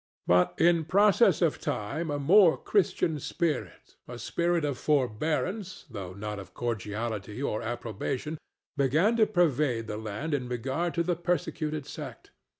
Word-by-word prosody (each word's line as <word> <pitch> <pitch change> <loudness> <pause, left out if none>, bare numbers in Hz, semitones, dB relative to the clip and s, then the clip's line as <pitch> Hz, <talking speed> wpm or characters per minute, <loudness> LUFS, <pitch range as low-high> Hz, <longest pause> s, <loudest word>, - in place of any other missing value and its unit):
But 90 0 +3
in 170 -1 +4
process 200 +3 +4
of 160 - +1
time 140 +11 -3
a 145 - -1
more 170 +5 +6
Christian 170 -6 +1
spirit—a 145 -5 -4
spirit 170 +6 0
of 140 -4 -2
forbearance, 155 - -1
though 95 -5 -6
not 105 +1 -5
of 95 -3 -11
cordiality 110 -1 -3
or 120 -6 -1
approbation—began 140 - -2
to 220 -2 +5
pervade 150 - +1
the 105 - -5
land 110 +9 -4
in 130 -4 -1
regard 135 +8 -2
to 170 - +2
the 175 0 0
persecuted 155 -3 -2
sect. 140 -6 -9
145 Hz, 135 wpm, -28 LUFS, 115-170 Hz, -, more